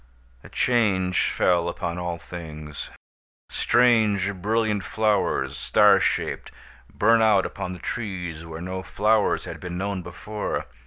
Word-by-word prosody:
A - - -12
change 100 -7 +1
fell 85 -1 +2
upon 85 0 -4
all 85 -1 -3
things. 75 -4 -8 0.6
Strange, 110 -5 +3
brilliant 105 +1 0
flowers, 100 -10 0
star - - +4
shaped, - - -1 0.4
burn 115 +2 +3
out 105 -4 +4
upon 90 - -5
the - - -7
trees 90 -5 -5
where 80 0 -8
no 95 +1 -4
flowers 105 +3 +1
had - - -7
been 90 -1 -6
known 100 0 -2
before. 105 +5 -4
95 Hz, 125 wpm, -24 LUFS, 85-105 Hz, 0.6 s, star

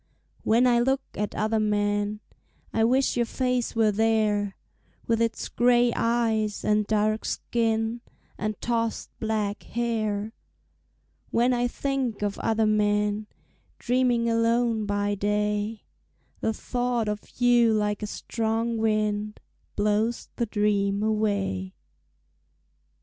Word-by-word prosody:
When 230 +3 +3
I 240 -1 +4
look 265 +3 +1
at 210 0 -3
other 220 +1 +1
men, 205 0 0 0.5
I 225 - +2
wish 255 +4 +2
your 240 -1 +1
face 250 -2 -1
were 220 -2 +3
there, 210 -2 +1 0.5
With 230 0 +1
its 230 -1 -1
gray 240 0 +3
eyes 225 -3 0
and 210 -1 +2
dark 215 0 +1
skin 225 0 -1 0.3
And 215 0 -3
tossed 230 -1 -1
black 215 -2 -1
hair. 220 -2 -2 1.0
When 245 +2 +2
I 245 0 +1
think 260 -4 -2
of 205 -1 -2
other 225 -1 +1
men, 210 0 +1 0.5
Dreaming 245 -1 +1
alone 230 -1 +1
by 205 0 0
day, 210 +1 -1 0.6
The 225 - 0
thought 245 0 -1
of 210 +2 -6
you 240 -2 +5
like 210 -1 0
a 210 - -3
strong 225 +1 -2
wind 215 -1 0 0.4
Blows 210 +3 0
the 235 - 0
dreams 205 -1 +1
away. 200 - -1
220 Hz, 115 wpm, -26 LUFS, 210-235 Hz, 1.0 s, you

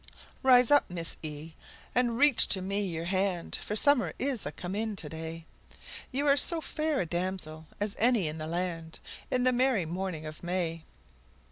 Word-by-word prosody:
Rise 250 -2 +5
up, 290 - +4
Miss, 170 -2 -2 0.8
and 240 -1 +1
reach 285 -2 +6
to 190 - +4
me 195 +2 -2
your 165 -2 -5
hand 185 -1 -1
For 210 - -4
summer 285 +3 +3
is 260 - -2
a - - -4
come 175 +5 -7
in 215 +1 -3
to 165 - -4
day; 160 +1 -8 0.7
You 275 +3 -1
are 280 -1 +4
so 335 +5 +6
fair 310 -2 -1
a - - -2
damsel 170 -2 -4
as 205 0 -3
any 230 -6 +4
in 155 +1 -4
the 155 - -5
land, 165 -1 -4 0.3
In 250 -1 0
the 255 - +3
merry 250 -7 +1
morning 175 -1 -5
of 155 0 -8
May! 175 -2 -2
190 Hz, 175 wpm, -29 LUFS, 165-250 Hz, 0.8 s, reach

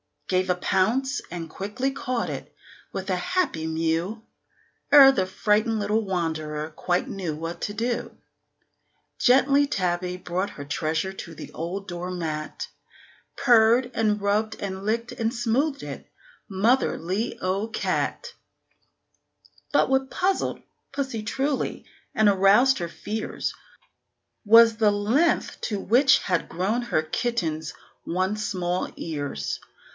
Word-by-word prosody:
Gave 185 0 +1
a 180 - +3
pounce, 235 +10 +1
and 165 -1 -5
quickly 210 +10 -3
caught 255 -3 -2
it, - - -7 0.4
with 195 +1 -4
a 185 - +1
happy 180 - -1
mew, 165 +7 -1 0.7
Ere 275 -2 +10
the 190 -8 0
frightened 210 +4 +1
little 210 +1 0
wanderer 160 -4 -2
quite 175 +3 -1
knew 180 -6 -4
what 165 +2 -5
to 205 - -2
do. 235 +3 -3 1.0
Gently 275 +3 +4
Tabby 180 -5 -1
brought 180 +2 -3
her 145 - -8
treasure 155 +5 -1
to 170 -3 -9
the - - -9
old 185 +5 -5
door 175 -1 -5
mat, 155 -4 -4 0.7
Purred, 240 0 +4
and 210 -2 +1
rubbed 210 +2 +1
and 190 -1 -5
licked 230 +2 -1
and 225 0 -1
smoothed 265 +5 0
it - - -8 0.4
motherly 205 -1 +1
old 195 +4 -2
cat! - - -2 1.4
But - - +4
what 265 0 +1
puzzled 380 +1 0 0.3
pussy 265 -6 -3
truly, 270 +6 -2 0.3
and 215 -1 +5
aroused 200 +7 +5
her 170 -1 -3
fears, 215 +5 -4 0.9
Was 225 +1 +7
the 215 -2 +4
length 220 +11 +1
to 205 -3 -1
which 260 +7 +5
had 180 -3 -1
grown 200 +8 -1
her 200 -10 0
kitten's 160 -5 -2 0.3
once 190 +5 -1
small 180 -2 -1
ears. 145 - -4
205 Hz, 125 wpm, -25 LUFS, 175-235 Hz, 1.4 s, Ere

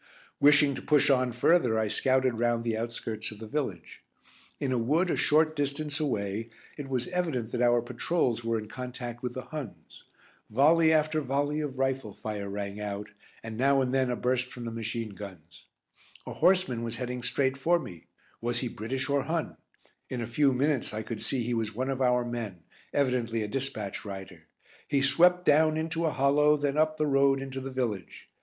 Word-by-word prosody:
Wishing 145 0 +6
to - - -6
push 150 -1 +4
on 130 -2 +2
further 125 -1 +3
I 110 -1 +1
scouted 130 +2 +2
round 120 -1 +1
the 115 -1 -1
outskirts 115 -1 -4
of 105 - -10
the 110 - -8
village. 110 - -4 0.6
In 135 - -1
a 125 - +1
wood 160 +10 +2
a - - +1
short 155 +1 +3
distance 145 +1 -2
away 110 -6 -2 0.3
it 140 -2 -7
was 125 -2 -1
evident 160 -11 -2
that 125 - -2
our 120 -1 +4
patrols 120 0 -1
were 115 0 0
in 110 -1 -5
contact 125 0 -6
with 125 -1 -4
the 130 - -4
Huns. 150 -8 -9 0.4
Volley 160 +7 +5
after 155 0 +2
volley 145 +2 -1
of 145 -4 -4
rifle 135 -5 -1
fire 105 -2 -5
rang 100 0 -5
out, 105 0 -4 0.3
and 110 -1 -6
now 135 +2 +3
and 130 -1 0
then 130 -1 +2
a 125 - 0
burst 125 +1 0
from 120 -1 -7
the 115 - -4
machine 115 0 -3
guns. 90 -4 -11 0.6
A - - -6
horseman 180 -11 +2
was 115 0 -3
heading 125 0 -4
straight 130 +2 +1
for 165 +6 +2
me. 90 - -9 0.3
Was 120 +1 0
he 125 - -2
British 130 +5 -3
or 140 -1 +1
Hun? 165 0 -2 0.5
In 125 - -3
a 115 - -2
few 135 +5 +2
minutes 135 -3 0
I 110 - -3
could 115 0 -6
see 130 -3 0
he 120 +1 -2
was 110 -2 -2
one 130 +3 -1
of 135 0 -3
our 125 -1 +3
men 115 -8 -5 0.3
evidently 125 -5 0
a - - -3
dispatch 120 -5 -3
rider. 95 -5 -9 0.4
He 140 -2 +1
swept 180 +6 +4
down 155 +1 +4
into 165 +1 -1
a - - +1
hollow, 150 +2 +3
then 145 -1 -1
up 155 0 +2
the 155 - +1
road 135 -1 +3
into 135 0 -5
the 135 - -5
village. 115 -9 -4
130 Hz, 195 wpm, -28 LUFS, 115-145 Hz, 0.6 s, Wishing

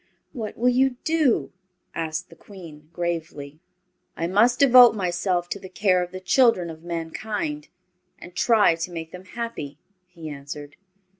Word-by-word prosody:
"What 225 -6 -6
will 245 +2 +3
you 255 0 +2
do?" 315 -6 +1 0.4
asked 160 +1 -4
the - - -13
Queen, 160 -5 -13
gravely. 160 -4 -4 0.6
"I 165 - -1
must 215 +8 +3
devote 250 -4 +7
myself 180 -2 -1
to 200 - -4
the 190 - -10
care 185 -1 +2
of 180 - -4
the 185 - -7
children 185 -4 +3
of 160 0 -12
mankind, 210 - -4 0.5
and 175 - -12
try 215 -2 +4
to 165 +2 -5
make 165 -1 -7
them 180 +1 -11
happy," 190 -11 -6 0.3
he 170 -3 -10
answered. 145 0 -8
180 Hz, 150 wpm, -24 LUFS, 165-230 Hz, 0.6 s, devote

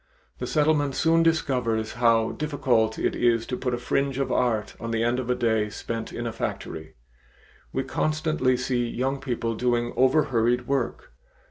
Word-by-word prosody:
The - - -3
Settlement 150 -2 +2
soon 165 0 +3
discovers 125 -9 +1
how 115 -2 +3
difficult 130 -7 0
it - - 0
is 115 -2 +2
to 125 - -3
put 125 -1 -1
a - - -4
fringe 135 +2 -1
of 135 - -1
art 115 -4 0
on 115 - -5
the 115 0 0
end 120 +2 +1
of 125 -1 -4
a 125 - +2
day 110 -3 +1
spent 115 +2 -5
in 120 - -5
a 115 - -3
factory. 80 -7 -5 0.8
We 135 - -1
constantly 155 -2 0
see 125 -1 -1
young 135 +3 -1
people 120 -3 -2
doing 120 +1 0
overhurried 125 -3 +2
work. 135 -2 -2
125 Hz, 165 wpm, -25 LUFS, 115-135 Hz, 0.8 s, soon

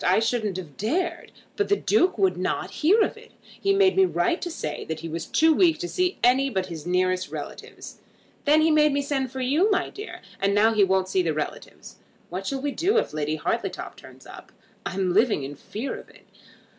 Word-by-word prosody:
I 185 - +4
shouldn't 225 -4 -1
have 160 -7 -9
dared. 340 - -2 0.2
But 410 - -1
the 405 - +4
Duke 380 - +2
would 190 -3 +2
not 180 0 -2
hear 385 +9 +5
of - - -3
it. - - -16
He 395 - -2
made 390 -1 +4
me 385 - +5
write 360 -1 0
to 350 - -3
say 155 - -5
that 160 -1 -5
he 165 - -5
was 165 +1 -5
too 320 0 +4
weak 330 0 +4
to 350 - -4
see 365 +1 -1
any 260 +3 +4
but 190 -6 -1
his 170 -3 -8
nearest 185 0 +1
relatives. - - -9 0.5
Then 305 +2 +5
he 320 +1 +4
made 300 -1 +4
me 285 0 0
send 270 -3 -2
for 265 0 -5
you, 295 +11 +2
my 390 - 0
dear; 415 +2 -9 0.2
and 200 +1 +2
now 220 +2 +4
he 210 -2 +4
won't 190 -1 +2
see 190 0 +1
the 165 -3 -1
relatives. 155 -1 -6 0.3
What 185 +2 -4
shall 270 -1 -2
we 290 - 0
do 390 +10 +1
if - - 0
Lady 155 0 -1
Hartletop 155 - -3
turns - - -15
up? - - -12 0.4
I'm 185 -1 -1
living 215 - +3
in 140 +2 -6
fear 225 - -5
of - - -15
it. - - -20
240 Hz, 220 wpm, -25 LUFS, -, 0.5 s, hear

